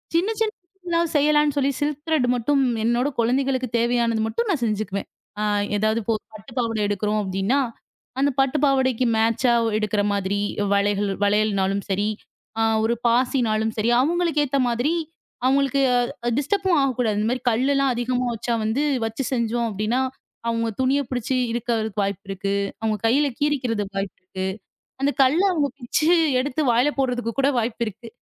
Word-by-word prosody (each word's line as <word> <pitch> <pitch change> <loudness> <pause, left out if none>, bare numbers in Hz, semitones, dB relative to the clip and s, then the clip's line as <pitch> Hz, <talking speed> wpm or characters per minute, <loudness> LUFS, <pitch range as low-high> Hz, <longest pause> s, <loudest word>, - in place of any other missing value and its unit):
சின்ன 355 +5 +2
சின்னது 435 -3 -1 0.3
எல்லாம் 335 -1 +1
செய்யலாம்னு 295 0 +3
சொல்லி 280 0 +2
சில்க் 295 -1 -2
த்ரெட் 310 -6 +2
மட்டும் 275 +4 +1 0.2
என்னோட 240 +3 +2
குழந்தைகளுக்கு 260 +2 +1
தேவையானது 235 -1 +1
மட்டும் 465 - -2
நான் 310 -11 0
செஞ்சுக்குவேன். 205 -2 -2 0.3
ஆ 210 - -1 0.3
ஏதாவது 215 +2 +1
இப்போ 225 +2 -1
ஒரு - - -24
பட்டுப் 215 +4 -12
பாவாடை 230 -3 -1
எடுக்குறோம் 210 +1 0
அப்படின்னா, 195 +7 0 0.6
அந்தப் 275 -1 +1
பட்டுப் 270 +2 0
பாவாடைக்கு 260 -3 +2
மேட்ச்சா 230 +2 +2
ஒ - - +1
எடுக்குற 215 -1 0
மாதிரி 200 0 -1 0.3
வளைகள் 200 0 +1
வளையல்னாலும் 200 -1 +1
சரி, 200 +2 0 0.5
அ - - +2 0.2
ஒரு 230 +2 +2
பாசினாலும் 230 -3 +1
சரி 220 +2 +1
அவங்களுக்கு 330 0 +1
ஏத்த 275 0 0
மாதிரி, 245 +7 0 0.5
அவங்களுக்கு 275 +1 +2 0.6
டிஸ்டர்ப்பும் 375 +4 +1
ஆகக் 265 -3 0
கூடாது. 220 -4 +1
இந்த 215 - 0
மாதிரி 250 -1 -3
கல்லுலாம் 275 +3 +2
அதிகமா 245 +1 -1
வச்சா 235 +2 -2
வந்து 230 +7 0 0.2
வச்சு 225 +4 -3
செஞ்சோம் 235 -1 0
அப்படின்னா. 215 +5 -1 0.5
அவங்க 230 0 0
துணியைப் 265 0 +1
புடிச்சு 255 0 -2 0.2
இழுக்குறதுக்கு 225 -3 -1
வாய்ப்பு 200 +1 -3
இருக்கு. 195 +1 -2 0.3
அவங்க 220 -1 0
கையில 275 +6 +3
கீறிக்கிறதுக்கு 245 -9 -1
வாய்ப்பு 195 -1 -3
இருக்கு. 190 0 -4 0.5
அந்தக் 280 +1 0
கல்லை 310 +9 +4
அவங்க 295 -5 +1
பிச்சு 280 +6 0 0.3
எடுத்து 285 +3 -1
வாயில 245 +5 +3
போடுறதுக்கு 245 -3 0
கூட 275 +1 +3
வாய்ப்பு 235 +1 -2
இருக்கு. 225 +3 -8
240 Hz, 155 wpm, -23 LUFS, 215-275 Hz, 0.6 s, கல்லை